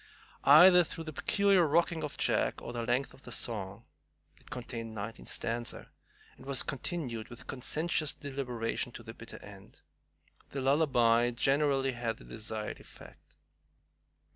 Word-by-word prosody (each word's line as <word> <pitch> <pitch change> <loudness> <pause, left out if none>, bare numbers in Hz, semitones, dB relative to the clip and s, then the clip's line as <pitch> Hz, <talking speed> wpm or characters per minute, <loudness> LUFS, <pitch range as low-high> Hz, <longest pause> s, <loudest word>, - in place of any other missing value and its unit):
Either 175 +5 +9
through 165 +1 -6
the 155 -1 -7
peculiar 200 +1 +3
rocking 165 +1 +2
of 150 - -5
Jack - - +1
or 120 - -7
the 120 - -2
length 125 +3 0
of 135 - -15
his - - -5
song, 100 -1 -5 0.5
it - - -21
contained 115 -3 -6
ninety 110 +2 -6
stanzas, 115 +1 -3 0.5
and - - -14
was 140 -2 +2
continued 135 -6 -4
with 120 - -10
conscientious 155 +3 -1
deliberation 125 -4 -3
to 120 - -9
the 115 0 -9
bitter 115 0 -10
end, 100 -2 -14 0.7
the 140 - -4
lullaby 125 -4 +3
generally 135 +2 +2
had 120 -2 -3
the - - -14
desired 110 - -5
effect. - - -16
125 Hz, 140 wpm, -31 LUFS, 115-150 Hz, 0.7 s, Either